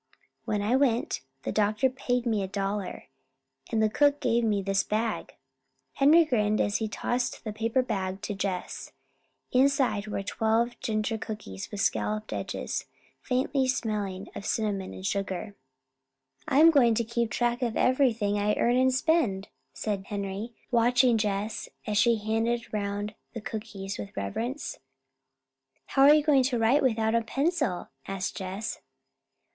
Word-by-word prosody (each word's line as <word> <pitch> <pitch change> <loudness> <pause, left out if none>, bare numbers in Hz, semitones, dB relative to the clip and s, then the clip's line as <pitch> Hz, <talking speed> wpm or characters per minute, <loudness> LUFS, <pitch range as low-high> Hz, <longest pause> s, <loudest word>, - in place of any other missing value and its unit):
"When 205 -1 -1
I 225 +5 +2
went, 255 -3 +1 0.2
the - - -2
doctor 215 +3 +2
paid 250 -1 -1
me 220 -4 +1
a 190 - -2
dollar, 195 -4 -3 0.6
and 220 -1 +2
the - - +5
cook 285 +6 +3
gave 235 0 +1
me 205 -3 +1
this 195 0 +2
bag." 220 +1 -2 0.6
Henry 315 +4 +6
grinned 215 -6 +1
as 205 - +1
he 220 - -2
tossed 245 +3 -2
the 215 -3 -4
paper 230 +4 +1
bag 190 -5 -3
to 210 - -2
Jess. 190 -2 -4 0.6
Inside 260 -5 +2
were 205 -2 -3
twelve 225 +3 +1
ginger 220 0 -1
cookies 155 - -6
with 205 - -4
scalloped 215 0 -1
edges, - - -3 0.4
smelling 255 +1 +1
faintly 215 -8 -1
of - - -7
cinnamon 200 -3 -1
and 190 - -8
sugar. 195 0 -2 0.9
"I'm 315 +5 +7
going 240 -7 +5
to 235 - +1
keep 235 0 -1
track 240 +1 0
of 235 -3 -1
everything 235 -6 +2
I 210 +1 +1
earn 240 +1 +2
and 260 0 +4
spend," 255 - +1 0.2
said 200 -3 -3
Henry, 200 +2 -4 0.2
watching 245 +1 +4
Jess 210 +1 -2 0.2
as 210 -1 +1
she 235 0 +5
handed 225 +2 -1
around 205 0 -2 0.2
the 230 - -5
cookies 210 -3 -6
with 100 -1 -8
reverence. 230 - -3 1.1
"How 270 - 0
are 295 - +9
you 305 - +3
going 290 -3 +5
to 250 -2 0
write 230 +6 +3
without 225 -3 +1
a 230 - +3
pencil?" 270 - -1 0.2
asked 195 -1 -3
Jess. 195 +3 -4
220 Hz, 150 wpm, -28 LUFS, 205-245 Hz, 1.1 s, are